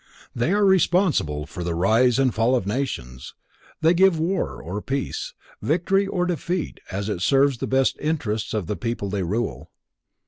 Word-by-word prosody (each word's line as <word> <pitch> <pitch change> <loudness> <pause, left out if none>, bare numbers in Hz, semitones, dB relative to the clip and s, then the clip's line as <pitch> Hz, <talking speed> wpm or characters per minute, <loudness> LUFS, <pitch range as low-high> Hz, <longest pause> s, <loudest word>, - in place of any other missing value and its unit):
They 120 +8 0
are 205 0 +3
responsible 175 - +2
for 90 - -7
the 85 -1 -2
rise 115 +8 +3
and 135 -3 +2
fall 115 +3 +2
of 120 - -1
nations, 100 - -4 0.5
they 160 +2 +5
give 185 -1 +4
war 175 +4 -1
or 95 +5 -5
peace, 135 +3 -3 0.3
victory 190 +5 +1
or 180 -2 0
defeat 175 0 -3
as 100 +1 -3
it 100 -5 -3
serves 135 +4 +3
the - - -3
best 135 0 +1
interests 115 -10 -2
of 105 -4 -1
the 105 - -3
people 115 -4 -3
they 100 -1 -1
rule. 105 +6 -3
130 Hz, 170 wpm, -23 LUFS, 100-165 Hz, 0.5 s, they